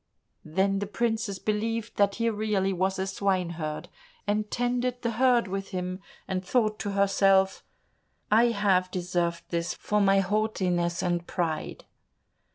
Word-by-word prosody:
Then 195 +5 +1
the 205 - -3
princess 220 -2 -1
believed 225 +2 -2
that 200 -1 +3
he 230 0 0
really 205 -3 0
was 190 +1 0
a 190 - -1
swineherd, 180 -5 -2 0.4
and 210 +1 0
tended 245 0 -1
the 235 - 0
herd 245 -1 +3
with 195 +1 -4
him, 185 -1 -4 0.3
and 185 -1 -2
thought 215 +1 +1
to 205 -1 -3
herself, 195 -1 +3 0.7
"I 225 +3 +6
have 200 -5 +2
deserved 175 -2 -1
this 170 +1 -2
for 210 0 0
my 195 0 +4
haughtiness 185 -4 0
and 175 -1 -1
pride." 165 -4 -3
195 Hz, 140 wpm, -27 LUFS, 185-215 Hz, 0.7 s, I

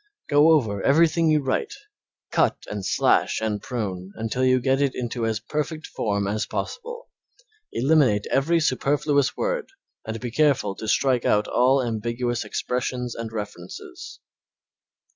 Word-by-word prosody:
Go 145 +2 +5
over 110 -10 +1
everything 160 - +3
you 155 -2 +3
write, 130 - -1 0.6
cut - - +1
and 105 -2 -4
slash - - +2
and 105 -2 -2
prune 95 -6 -4
until 115 +3 -2
you 130 0 +4
get 135 +2 +1
it 140 -2 +1
into 120 -2 -2
as 110 -2 -1
perfect 150 +6 -4
form 100 -2 -2
as 105 +2 -1
possible. 475 +1 -6 0.6
Eliminate 130 -7 +3
every 165 +5 +2
superfluous 145 -1 +1
word - - -2 0.3
and 110 +1 -5
be 120 +1 -5
careful 135 -7 +2
to 110 - -6
strike 125 +2 +2
out 105 0 +2
all 130 +2 +3
ambiguous 120 +1 -2
expressions 125 +2 -3
and 115 -1 -6
references. 105 -5 -8
125 Hz, 140 wpm, -24 LUFS, 110-145 Hz, 0.6 s, Go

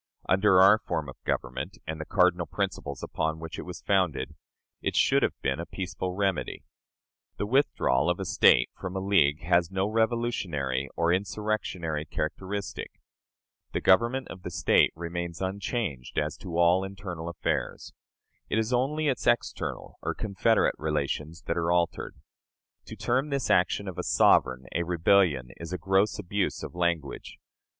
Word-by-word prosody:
Under 95 0 +4
our 100 +3 +7
form 80 -8 -3
of - - -13
government, 60 - -3
and 80 0 -5
the - - -5
cardinal 90 -2 +2
principles 95 -8 -3
upon 80 0 -2
which 80 +1 -7
it - - -6
was 90 - -8
founded, 95 -8 +1 0.5
it - - -2
should - - +4
have - - 0
been 65 +4 0
a 85 - -4
peaceful 90 0 -4
remedy. 95 -2 -1 0.7
The - - -1
withdrawal 95 - +2
of 90 - 0
a - - -3
State - - +4
from 95 0 -7
a - - -1
league 90 -7 +2
has 85 0 +3
no 95 0 0
revolutionary 105 - -1
or 85 0 +2
insurrectionary 90 -5 -2
characteristic. 100 +5 -4 0.7
The - - 0
government 120 +7 +3
of 95 - -9
the 90 - -5
State 85 -3 +3
remains 85 0 -5
unchanged 95 - -3
as - - 0
to 85 -2 -6
all 85 +2 +4
internal 95 -4 -6
affairs. 85 -4 -3 0.6
It - - 0
is 110 +2 0
only 150 +5 +1
its 130 -4 -1
external 120 -1 -1
or - - -2
confederate 110 +2 +2
relations 75 +1 -2
that - - -2
are 85 0 +1
altered. 85 -1 0 0.7
To - - -9
term 130 +5 0
this 140 -3 -1
action 95 +2 +2
of 95 - -6
a - - -2
sovereign 65 0 +3
a 85 - 0
"rebellion," 85 -6 +2
is 85 0 -8
a 90 - -2
gross 95 +2 +2
abuse 100 0 -2
of - - -6
language. 85 -5 -2
90 Hz, 160 wpm, -28 LUFS, 80-100 Hz, 0.7 s, our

